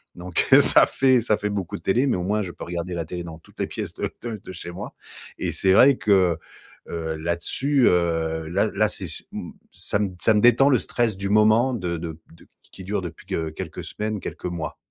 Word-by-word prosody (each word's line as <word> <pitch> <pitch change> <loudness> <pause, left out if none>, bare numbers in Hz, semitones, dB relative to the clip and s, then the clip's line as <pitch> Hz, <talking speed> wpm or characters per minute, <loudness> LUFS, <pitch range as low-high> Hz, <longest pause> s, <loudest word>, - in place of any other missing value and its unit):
donc 90 0 -2
heu, - - +9
ça - - +8
fait 130 -2 +3
ça 110 -2 +1
fait 105 - -3
beaucoup 100 -4 -4
de 85 - -17
télé, 125 +8 +2
mais 130 - +1
au 90 - -3
moins 105 +3 0
je 90 - -6
peux - - -10
regarder 85 +1 -5
la 85 -2 -3
télé 90 +2 -6
dans 80 -2 -9
toutes - - -23
les - - -1
pièces - - -5
de - - -3
de 115 -4 -5
de 95 - -9
chez 85 0 -7
moi 95 +4 -8 0.4
et - - -2
c'est 95 -1 +4
vrai 130 +7 +6
que, 95 -5 +2 0.5
heu, 80 -1 -4
là-dessus, 85 - 0
heu, 80 -2 0
là 100 +5 +1
là 110 0 +2
c'est 95 - -3
ch 80 - -4
m - - -7 0.2
ça - - -1
m 100 -3 -2
ça 110 - +5
me 105 - +2
détend 120 +4 +5
le 130 -4 +4
stress 115 -4 0
du 100 0 -3
moment 110 +5 +4
de 90 -7 -3
de 80 0 -6 0.2
d 85 - -20
q - - -29 0.2
qui 95 - -10
dure 100 +1 -2
depuis 85 -3 -9
que 80 -1 -2
quelques 80 - -7
semaines, 105 0 -4
quelques - - -8
mois. 85 -3 -4
95 Hz, 235 wpm, -23 LUFS, 85-110 Hz, 0.5 s, heu